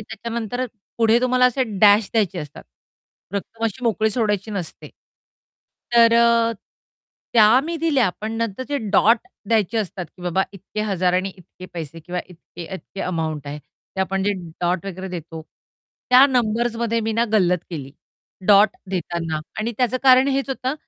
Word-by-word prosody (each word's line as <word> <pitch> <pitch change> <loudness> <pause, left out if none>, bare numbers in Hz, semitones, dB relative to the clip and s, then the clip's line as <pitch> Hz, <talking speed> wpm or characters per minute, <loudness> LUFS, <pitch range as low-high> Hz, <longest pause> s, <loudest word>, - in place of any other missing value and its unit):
त्याच्यानंतर 235 +3 -4 0.3
पुढे 225 0 +4
तुम्हाला 255 0 +3
असे 250 +1 +1 0.2
डॅश 205 0 +6
द्यायचे 200 -5 +1
असतात 150 -3 -8 0.7
रक्कम 225 +3 -4
अशी 235 +3 -3
मोकळी 220 -1 +1
सोडायची 210 -2 -1
नसते. 190 -6 -6 1.1
तर 230 -1 +6
अ, 235 0 +4 0.8
त्या 225 +2 +6
मी 335 +1 -3
दिल्या 290 - +2
पण 215 +1 -4
नंतर 230 0 -2
जे 285 -1 -1
डॉट 225 +3 +5 0.3
द्यायचे 225 0 +1
असतात 185 -3 -4
की 180 - -13
बाबा 180 +2 +1
इतके 195 +2 -7
हजार 185 -4 0
आणि 185 +2 +1
इतके 185 0 -13
पैसे 165 -1 -7
किंवा 180 +2 -4
इतके, 175 0 -12
इतके 195 +1 -9
अमाउंट 160 -4 -3
आहे 145 +1 -5
ते 150 +5 -11
आपण 190 0 -1
जे 205 +1 +1 0.3
डॉट 175 +1 -1
वगैरे 190 0 -6
देतो, 165 -2 -7 0.7
त्या 255 +2 +8
नंबर्समध्ये 235 -2 0
मी 225 0 -2
ना 230 +2 +2
गल्लत 180 -4 +3
केली. 140 -5 -6 0.5
डॉट 205 +1 +7 0.2
देताना 170 -3 -3 0.2
आणि 225 +2 -2
त्याचं 250 -1 +1
कारण 260 0 +6
हेच 275 0 -1
होतं, 260 +1 -2
215 Hz, 155 wpm, -21 LUFS, 180-235 Hz, 1.1 s, त्या